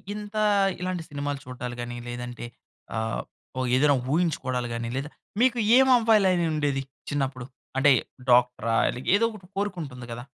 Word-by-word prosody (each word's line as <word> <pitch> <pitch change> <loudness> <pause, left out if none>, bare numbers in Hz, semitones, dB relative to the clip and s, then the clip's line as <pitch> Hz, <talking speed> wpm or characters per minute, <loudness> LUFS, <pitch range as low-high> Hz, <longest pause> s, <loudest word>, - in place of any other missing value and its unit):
ఇంత 210 0 -8 0.5
ఇలాంటి 180 -2 -2
సినిమాలు 145 -1 -3
చూడడాలు 125 -1 -6
గాని, 120 0 -5
లేదంటే 120 0 -6 0.5
ఆహ్, 110 0 -2 0.4
ఓహ్! 130 - 0
ఏదేనా 145 +1 +4
ఊహించుకోడాలు 135 -6 0
గాని, 115 0 -3
లేదా 145 +2 -3 0.3
మీకు 250 -1 +4 0.2
ఏం 265 0 +6
అవ్వాలనుండేది 175 - +2 0.3
చిన్నప్పుడు? 135 -3 -2 0.3
అంటే, 140 +2 +6 0.4
డాక్టరా? 125 -2 +3 0.2
ఇలాగ 125 +2 -5
ఏదో 230 - +3
ఒకటి 200 -4 -12
కోరికుంటుంది 165 -11 -4
కదా? 120 +1 -6
140 Hz, 135 wpm, -26 LUFS, 125-180 Hz, 0.5 s, ఏం